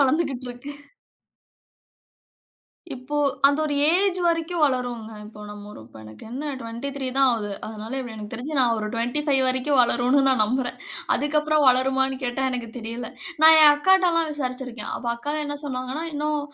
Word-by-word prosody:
வளந்துகிட்டு 275 -2 +1
இருக்கு. 245 +4 -8 2.2
இப்போ 255 +4 -6 0.3
அது 285 +2 0
ஒரு 290 -1 -1 0.2
ஏஜ் 375 0 +2
வரைக்கும் 330 0 0
வளருங்க. 245 -4 -2 0.2
இப்போ 210 0 -13
நமக்கு 110 - -12
என்ன 290 +4 -4
23 260 +4 -5
தான் 270 -1 +5
ஆகுது. 215 -3 -2 0.2
அதனால 220 +4 -6
இப்டி 245 -3 -7
எனக்கு 210 0 -9
தெரிஞ்சு 275 +4 -4
நான் 240 -3 +3
ஒரு 215 - -3
25 265 +4 +1
வரைக்கும் 260 +2 +1
வளரும்னு 250 +3 +2
நான் 255 -5 +3
நம்புறேன். 250 +2 -2 0.4
அதுக்கப்றம் 300 +1 +1
வளருமான்னு 265 +1 +2
கேட்டா 245 +2 -2
எனக்கு 245 -2 -4
தெரியல. 230 0 -6 0.3
நான் 320 0 +9
என் 300 - +9
அக்காட்ட 370 +4 +3
எல்லாம் 330 -1 +1
விசாரிச்சிருக்கேன். 255 -5 -5
அப்ப 240 - -8
அக்கா 290 +5 -4
என்ன 290 0 -4
சொன்னாங்கன்னா, 260 +3 -4
இன்னும் 300 0 -1
260 Hz, 145 wpm, -23 LUFS, 240-295 Hz, 2.2 s, நான்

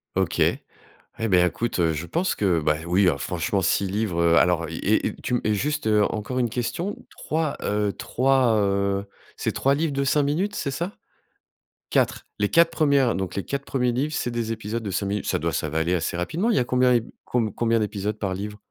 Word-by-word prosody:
OK. - - 0
Et 115 - -3
ben, 90 -2 +5
écoute, 115 +4 -2
heu, 80 -2 +2
je 75 +2 -4
pense 180 +3 0
que, 90 -5 +2
ben, 75 +1 0
oui, 90 +3 +3
alors 90 - +1
franchement, 90 +2 -1
6 95 +2 +1
livres, 95 -3 -1
heu, 85 0 +4
alors, 85 -1 +3
et - - +1
et - - -4
tu 125 - 0
m 105 - +1
juste, 145 +4 -1
heu, 105 -1 +4
encore 110 +4 -3
une 120 -2 +1
question, 145 - -3 0.2
3, 155 -1 -2
heu, 105 -1 0
3, 130 -2 +2
heu, 100 -1 +1 0.3
c'est - - -1
3 135 +1 +2
livres 155 0 -1
de 140 0 0
5 145 +1 +3
minutes, 175 +9 -1
c'est 140 - -2
ça? 170 +8 -3 1.0
4, - - +1
les 105 0 +1
4 165 0 +5
premières, 140 -6 +3
donc 95 -1 -3
les 100 - -2
4 140 0 -3
premiers 125 -3 0
livres, 145 +5 -1
c'est 120 - -1
des 115 -1 -2
épisodes 110 +1 -3
de 105 - -4
5 100 +2 -1
minutes. 100 +1 -2
Ça - - +1
doit 85 +1 -1
ça 80 - -1
va 80 - -3
aller 85 +3 +1
assez 85 0 -2
rapidement. 165 - -1
Il - - +2
y - - +5
a - - +2
combien 125 -1 +3 0.3
com 115 -5 0
combien 115 -1 +1
d'épisodes 105 0 -2
par 95 -3 -1
livre? 105 +2 -6
110 Hz, 220 wpm, -24 LUFS, 95-135 Hz, 1.0 s, ben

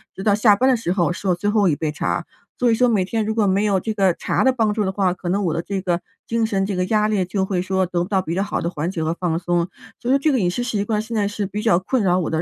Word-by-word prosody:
直 190 - -6
到 210 - +3
下 210 -1 +5
班 260 +3 +3
的 260 - +4
时 180 -6 -2
候 175 -3 +1
是 195 - -6
我 180 - +3
最 205 +4 -1
后 205 -2 +3
一 145 - +1
杯 155 0 -2
茶， 150 - -2 0.3
所 245 -1 +2
以 - - +4
说 250 +2 +3
每 205 -5 +2
天 220 +2 -1
如 220 +1 -2
果 215 -2 +2
没 195 +2 +2
有 195 -3 +2
这 220 - -2
个 195 -4 +2
茶 - - -1
的 260 - +4
帮 220 -4 +1
助 215 - 0
的 190 - 0
话， 190 -2 +1
可 185 - -8
能 200 +3 0
我 165 - 0
的 165 - -1
这 195 +2 -4
个 175 -2 0 0.3
精 230 -1 0
神 195 -3 0
这 195 -1 -3
个 180 - +1
压 210 +1 +2
力 195 -4 +1
就 190 +2 -1
会 185 -2 -1
说 190 0 0
得 175 0 -1
不 - - -6
到 195 -2 +2
比 165 -3 -4
较 190 - 0
好 205 - -2
的 170 - -1
缓 160 0 -3
解 165 -4 -3
和 160 +1 0
放 170 -2 -1
松。 175 0 0 0.3
所 250 +3 0
以 - - +5
这 305 +2 +2
个 260 - +2
饮 180 -4 +1
食 245 +7 -2
习 210 -5 -1
惯 215 -1 0
现 230 +1 -8
在 205 - +1
是 205 0 -3
比 205 +2 -4
较 185 -6 +3
困 235 +6 -1
扰 180 -1 +3
我 170 - -2
的， 160 0 -1
195 Hz, 365 characters per minute, -21 LUFS, 180-215 Hz, 0.3 s, 下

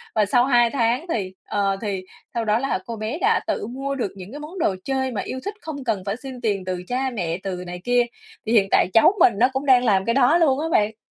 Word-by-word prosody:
và 215 - +3
sau 245 +5 +3
2 240 -3 +4
tháng 240 +4 0
thì, 190 -4 -3
ờ, 195 -1 0
thì 195 -3 -3 0.3
sau 235 -2 -2
đó 215 +2 +2
là 270 -7 -1
cô 230 - -5
bé 220 +6 -4
đã 445 +4 +3
tự - - -2
mua 270 +3 -4
được 240 -7 -2
những 190 +3 -10
cái 290 - -7
món 320 +5 -8
đồ 195 - +1
chơi 265 -1 -1
mà 210 - -2
yêu 260 - -5
thích, 405 - -3
không 290 -4 -6
cần 215 -7 -1
phải 200 +1 -1
xin 260 -2 -8
tiền 200 -5 -1
từ 180 -1 -3
cha 260 +1 -1
mẹ, 175 -8 -3
từ 180 -2 -4
này 180 0 -7
kia. 245 +1 +3 0.4
Thì 220 - -2
hiện 200 -4 +5
tại - - +4
cháu 225 +10 +6
mình 250 - +6
nó 245 - +5
cũng 270 +2 -2
đang 255 -2 +5
làm 195 -4 +3
cái 230 - +1
đó 275 +5 +4
luôn 290 -5 +3
á 320 - -1
bạn. 215 +1 +2
235 Hz, 265 wpm, -22 LUFS, 200-265 Hz, 0.4 s, cháu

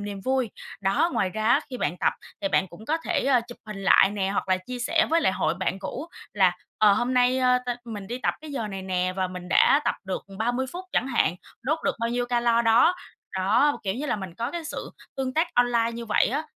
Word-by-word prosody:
niềm 205 -1 -5
vui. 260 -3 +1 0.3
Đó, 200 - +2
ngoài 190 - +1
ra 215 +2 -3
á, 235 - +5
khi 255 - -4
bạn 165 - -1
tập - - +2 0.3
thì 295 - 0
bạn 190 - +2
cũng 190 +6 -13
có 315 - +1
thể 275 -6 +2
chụp 240 - -10
hình 210 -2 -7
lại 195 0 +6
nè 195 -2 -1
hoặc 195 - -2
là 185 - +4
chia 245 +7 -7
sẻ 320 +7 +2
với 330 +1 +4
lại 275 - +2
hội 185 - 0
bạn 185 +1 -2
cũ 200 +7 -5 0.3
là, 185 -3 +3 0.2
ờ, 210 -1 +6
hôm 245 +5 0
nay 250 +1 +3 0.3
tao 245 - 0
mình 210 -4 -7
đi 245 +4 -4
tập - - 0
cái 310 -1 -9
giờ 230 -6 -3
này 195 -1 -6
nè 185 -1 -1
và 190 -1 +1
mình 180 -1 -8
đã 280 - +5
tập - - +1
được 190 -1 -4
30 245 +4 0
phút 360 +2 -6
chẳng 260 - +1
hạn, 235 -8 +2 0.3
đốt 310 +5 0
được - - +1
bao 230 - 0
nhiêu 245 0 -1
calo 235 -1 +2
đó. 230 +10 +5 0.4
Đó, 210 +10 +3
b - - -6
kiểu 190 -2 -1
như 280 +6 -4
là - - 0
mình 190 -4 -7
có 235 +5 -3
cái 340 +1 -5
sự - - -6 0.3
tương 260 -1 -2
tác 325 +2 +2
online 240 -1 +2
như 235 0 -6
vậy 210 - +3
á, 280 +7 -1
230 Hz, 250 wpm, -25 LUFS, 195-260 Hz, 0.4 s, lại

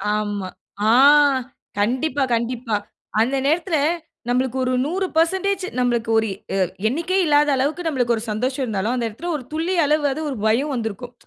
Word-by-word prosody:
ஆமா. 205 -2 -2 0.4
ஆ! - - +6 0.9
கண்டிப்பா, 260 +7 0
கண்டிப்பா. 235 -1 -2 0.5
அந்த 255 +4 +1
நேரத்துல 325 +3 +1 0.5
நம்பளுக்கு 255 +1 0
ஒரு 255 0 0
100% 375 +3 0 0.2
நம்பளுக்கு 240 -2 0
ஒரு 220 - -1 0.3
எ - - 0 0.3
எண்ணிக்கையே 340 +9 0
இல்லாத 295 -1 +4
அளவுக்கு 295 +6 -1
நம்பளுக்கு 245 -6 +1
ஒரு 220 - -5
சந்தோஷம் 255 +5 -1
இருந்தாலும், 215 +1 -1
அந்த 240 -2 -1
இடத்துல 330 +12 -7
ஒரு 260 - -9
துளியளவாது 310 -3 +1
அது 310 - -5
ஒரு 255 - -5
பயம் 270 +7 +1
வந்துருக்கும். 235 +1 -5
260 Hz, 145 wpm, -21 LUFS, 230-315 Hz, 0.9 s, ஆ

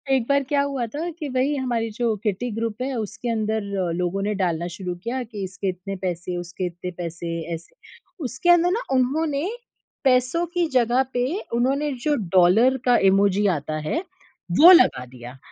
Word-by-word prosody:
एक 240 -3 0
बार 280 0 +3
क्या 285 +1 +1
हुआ 275 -3 -2
था, 305 +9 -4
कि 310 -3 -6
वही 260 +3 +1
हमारी 240 -4 -1
जो 230 0 0
किटी 215 +4 -1
ग्रुप 230 +1 -3
है 270 +1 -2
उसके 225 +3 -5
अंदर 220 -1 -1 0.3
लोगों 180 +2 -1
ने 210 +1 0
डालना 170 -2 0
शुरू 180 -2 -4
किया 250 +2 -2
कि 215 -4 -7
इसके 190 +1 -5
इतने 185 +2 -5
पैसे, 180 -1 -4
उसके 175 +1 -5
इतने 175 +1 -5
पैसे, 170 -1 -5
ऐसे। 165 - -9 0.5
उसके 260 +8 -2
अंदर 350 0 +5
ना 445 +6 0
उन्होंने, 285 +5 0 0.5
पैसों 260 +5 +2
की 350 -1 +1
जगह 250 +1 +3
पे 245 0 +1 0.3
उन्होंने 270 +5 +1
जो 300 -1 +2 0.2
डॉलर 220 +9 +5
का 245 -1 +5
इमोजी 200 +1 +3
आता 155 +2 -4
है 320 - 0 0.6
वो 345 +4 +10
लगा 335 - +5
दिया। 125 +1 -11
230 Hz, 175 wpm, -23 LUFS, 185-270 Hz, 0.6 s, वो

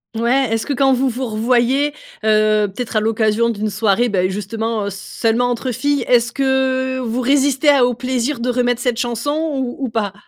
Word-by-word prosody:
Ouais. 245 +4 +1
Est-ce 225 - -2
que 285 - -1
quand 270 +1 +3
vous 260 +1 +1
vous 255 +2 -4
revoyez, 245 +5 +1 0.3
heu, 215 -1 +3
peut-être 220 +3 -4
à - - +5
l'occasion 220 +1 +1
d'une 215 -1 -2
soirée, 220 +3 +1
beh, 185 -2 +1
justement 215 +2 -3
seulement 225 +5 -1
entre 245 +1 -2
filles, 280 +2 -1
est-ce 235 -1 +3
que 260 -1 0
vous 245 0 -2
résistez 275 +2 +2
à 280 -3 +5
au 245 - -1
plaisir 255 +2 -2
de 245 +1 -2
remettre 245 -1 0
cette 245 -1 -1
chanson 240 +3 -2 0.2
ou 260 -2 -3
ou 265 -3 -2
pas? 215 -3 -2
240 Hz, 185 wpm, -18 LUFS, 220-260 Hz, 0.3 s, à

